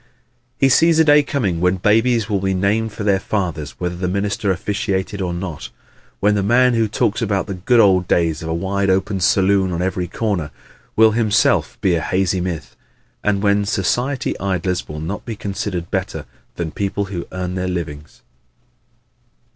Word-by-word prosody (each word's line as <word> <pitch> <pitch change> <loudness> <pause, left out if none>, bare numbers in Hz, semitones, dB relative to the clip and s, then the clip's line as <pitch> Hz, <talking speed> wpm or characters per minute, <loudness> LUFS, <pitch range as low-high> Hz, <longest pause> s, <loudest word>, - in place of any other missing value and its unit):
He 135 - +4
sees 165 +5 +4
a 160 - +6
day 150 -1 +6
coming 120 - -1
when 90 +1 +3
babies 110 +3 +2
will 105 -3 0
be 95 0 0
named 105 +4 0
for 105 - -6
their 100 -2 +2
fathers 85 -9 -3
whether 90 0 -2
the 90 +1 -2
minister 100 +2 -1
officiated 100 +1 -2
or 90 -2 -1
not; 85 -2 -5 0.5
when 105 +1 +3
the 105 - +1
man 120 +5 +4
who 115 -1 +2
now - - -5
talks 110 +3 0
about 100 -4 0
the 100 - -5
"good 115 +7 +2
old 95 -4 +4
days 80 -2 +1
of 80 - -5
a - - 0
wide 100 +2 -1
open 95 +1 +1
saloon 95 +1 +3
on 85 +1 -2
every 90 -1 -2
corner" 95 -5 -2 0.5
will 110 0 +6
himself 105 -2 +2
be 95 - +2
a 85 - +1
hazy 95 +1 0
myth; 80 -8 -5 0.5
and 100 -1 +1
when 100 0 +3
society 120 +7 -1
idlers 95 -2 -1
will 75 0 -6
not 85 +6 -5
be 115 - -5
considered 95 -3 -4
better 95 -2 -3 0.3
than 80 -2 -3
people 100 +2 -2
who 90 -3 -6
earn 90 -1 -4
their 90 0 -2
livings. 80 -4 -6
95 Hz, 180 wpm, -19 LUFS, 90-105 Hz, 0.5 s, a